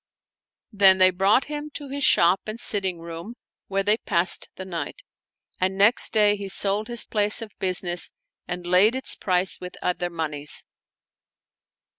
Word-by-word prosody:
Then 195 -3 +5
he 185 0 +5
brought 195 +7 +2
him 295 0 -7
to 290 - -7
his 280 +1 -5
shop 175 -3 +4
and 215 +2 -6
sitting 190 -7 -1
room 170 +7 -9 0.3
where 195 0 -2
they 210 +2 +2
passed 175 -4 +1
the 190 - -8
night; 170 -6 -7 0.6
and 190 +1 -1
next 205 +4 +5
day 210 -2 +3
he 200 -1 -7
sold 200 +2 +2
his 240 -1 +2
place 210 -1 +1
of 225 -2 -8
business 180 -2 +1 0.4
and 180 0 -6
laid 185 +7 +3
its 260 - -4
price 185 0 -1
with 180 0 -9
other 180 0 -2
moneys. 150 -3 -4
195 Hz, 155 wpm, -23 LUFS, 180-215 Hz, 0.6 s, Then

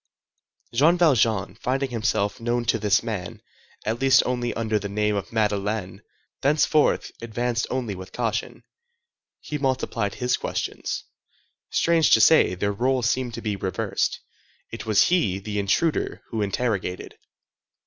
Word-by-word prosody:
Jean 155 +9 +4
Valjean, 115 - +2
finding 130 +4 -2
himself 110 -3 0
known 120 +1 -1
to 115 - +1
this 105 0 +2
man, 105 -7 -5 0.5
at 115 +3 -2
least 135 -1 +5
only 120 -1 -1
under 110 -2 0
the 100 0 -5
name 105 +1 0
of 100 -2 -4
Madeleine, 105 -2 -1 0.4
thenceforth 150 +1 +2
advanced 115 +1 -2
only 125 -5 -2
with 95 0 -9
caution. 115 -2 -3 0.8
He 150 - -5
multiplied 130 -6 -1
his 125 0 0
questions. - - -4 0.7
Strange 165 -2 +3
to - - +2
say, 110 - +5
their 100 +3 -1
rôles 125 +3 +1
seemed 125 0 0
to - - -7
be 105 -2 -1
reversed. 95 -2 -2 0.5
It 115 0 -7
was 110 -2 +4
he, 160 - +2
the 105 +1 -4
intruder, 125 - 0
who 110 -2 -2
interrogated. 100 -3 -2
115 Hz, 140 wpm, -24 LUFS, 105-125 Hz, 0.8 s, least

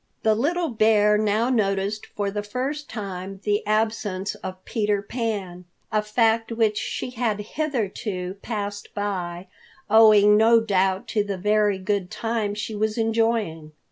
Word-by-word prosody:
The 220 - +4
little 325 +9 0
bear 215 -2 +4
now 215 +3 +1
noticed 200 -2 0
for 200 -1 -3
the 205 +1 -2
first 265 +8 -4
time 195 -2 -6
the 205 0 +1
absence 215 -3 0
of 185 0 -8
Peter 210 -3 0
Pan, 200 -5 -4 0.3
a 215 - +2
fact 225 +1 +1
which 220 -2 +1
she 250 - -4
had 230 -4 -1
hitherto 210 -7 -3
passed 205 -2 -5
by, 185 -4 -3 0.5
owing 210 -2 +7
no 230 +2 +6
doubt 195 -3 0
to 210 - +1
the 200 -2 -4
very 210 +1 +2
good 190 -1 -2
time 225 -3 -2
she 210 +1 -4
was 215 +1 -1
enjoying. 225 -9 0
210 Hz, 140 wpm, -24 LUFS, 200-225 Hz, 0.5 s, owing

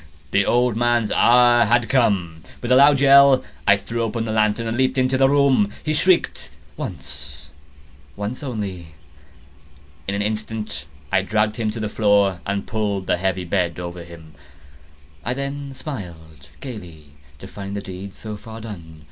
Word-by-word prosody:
The - - +2
old 120 -2 +2
man's 120 -2 +1
hour 120 0 +5
had 120 +1 +2
come! 100 -11 +1 0.2
With 120 - -4
a - - +7
loud 140 +1 +6
yell, 140 -1 +6 0.2
I 100 0 +6
threw 115 +4 -4
open 115 0 -2
the 110 - -3
lantern 110 +1 +1
and 115 0 -2
leaped 130 +1 +1
into 130 0 +2
the 135 0 +4
room. 135 -7 +3
He 155 - -1
shrieked 180 +3 +1 0.3
once—once 75 - -9
only. 95 - -6 1.1
In 100 - -1
an 100 - -1
instant 110 +1 -4 0.2
I 95 -1 +3
dragged 105 +2 0
him 110 -2 -1
to 110 +2 -5
the 110 - -2
floor, 100 -3 +2
and 100 0 -2
pulled 105 -4 -2
the - - +1
heavy 95 0 -1
bed 85 -1 -1
over 85 0 -6
him. 85 -2 -13 0.9
I 125 - -2
then 140 +1 -5
smiled 80 - -9
gaily, 90 - -9 0.3
to - - -11
find 100 0 -7
the 100 - -3
deed 95 +1 -9
so 105 -1 -7
far 110 +2 -10
done. 85 -8 -10
105 Hz, 160 wpm, -21 LUFS, 90-120 Hz, 1.1 s, a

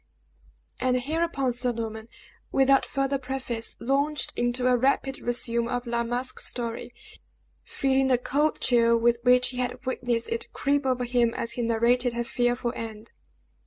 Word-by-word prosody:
And 255 0 +2
hereupon 290 -2 -1
Sir 245 0 -1
Norman, 220 -1 -5 0.4
without 270 0 +4
farther 275 0 -1
preface, 255 -3 -3
launched 280 +4 0
into 240 +1 0
a 250 0 +5
rapid 270 +2 +1
resume 235 -1 -1
of 245 +1 -2
La 235 0 0
Masque's 245 +2 -2
story, 235 -1 -4 0.7
feeling 270 0 +1
the 255 -2 +4
cold 290 +5 0
chill 235 -2 +4
with 235 0 +2
which 250 +1 +4
he 250 - -7
had 250 +1 -3
witnessed 245 -2 -1
it 460 -1 -3
creep 285 -1 0
over 255 -1 +1
him 240 -1 +1
as 235 - -2
he 245 - -3
narrated 235 +2 +2
her 235 0 -1
fearful 245 0 0
end. 220 0 -7
245 Hz, 155 wpm, -26 LUFS, 235-265 Hz, 0.7 s, a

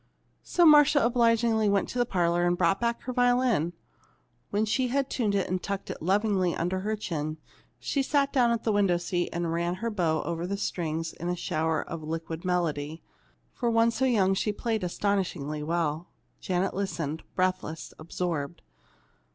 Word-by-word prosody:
So 350 - +2
Marcia 295 -2 +7
obligingly 230 -2 +3
went 200 -1 +2
to 250 - -3
the 245 - +2
parlor 175 -3 +1
and 175 0 +1
brought 180 +2 +2
back 235 0 -1
her 255 - -4
violin. 245 - +2 0.8
When 210 +2 +1
she 250 +4 +1
had 275 +2 -1
tuned 210 -5 0
it 195 - +1
and 185 0 -2
tucked 200 0 -4
it - - -8
lovingly 190 0 +1
under 180 +3 -1
her 215 +3 -1
chin, 155 -6 -4 0.4
she 280 - -1
sat 280 0 +1
down 250 -4 +4
in 235 - +2
the 225 - +1
window 200 -4 +3
seat 175 0 -2
and 170 -1 -2
ran 170 +1 -1
her 230 +4 -3
bow 170 -6 0
over 170 +1 -3
the 200 +1 -2
strings 165 -4 -3
in 170 - -5
a 180 - 0
shower 160 -1 -1
of 165 -1 -7
liquid 160 +1 -5
melody. 160 -4 -1 0.5
For 240 - -1
one 230 0 +3
so 265 +3 0
young 200 -7 +3
she 205 +2 0
played 220 0 -2
astonishingly 180 -6 -1
well. 160 +1 -1 0.3
Janet 185 +1 -1
listened, 165 -6 -3
breathless, 185 -3 -2
absorbed. 165 -2 -4
185 Hz, 175 wpm, -28 LUFS, 170-230 Hz, 0.8 s, Marcia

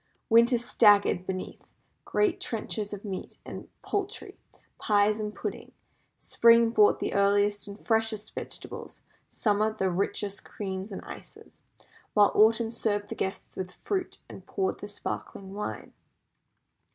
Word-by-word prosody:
Winter 235 +2 +6
staggered 205 -5 +4
beneath 185 -1 -6 0.3
great 395 -2 +1
trenchers 220 - -3
of 205 0 -7
meat 190 -2 -6
and - - -8
poultry, 405 +2 -3 0.4
pies, 210 0 +3
and 210 0 -4
puddings; - - -6 0.4
Spring 230 0 +5
brought 210 -3 +5
the - - -2
earliest 205 +1 +2
and 200 +1 -9
freshest 220 -2 0
vegetables; - - -7 0.3
Summer, 215 0 +1
the 190 -4 -1
richest 200 +2 -2
creams 190 0 -5
and 195 - -6
ices; - - -12 0.5
while 205 -1 +6
Autumn 225 +1 +4
served 205 -3 -1
the - - -4
guests 190 - -4
with 185 -1 -4
fruit, 375 - -3
and - - -11
poured 385 -1 -1
the - - -7
sparkling 195 0 -6
wine. 210 +1 -5
210 Hz, 130 wpm, -28 LUFS, 200-230 Hz, 0.5 s, Winter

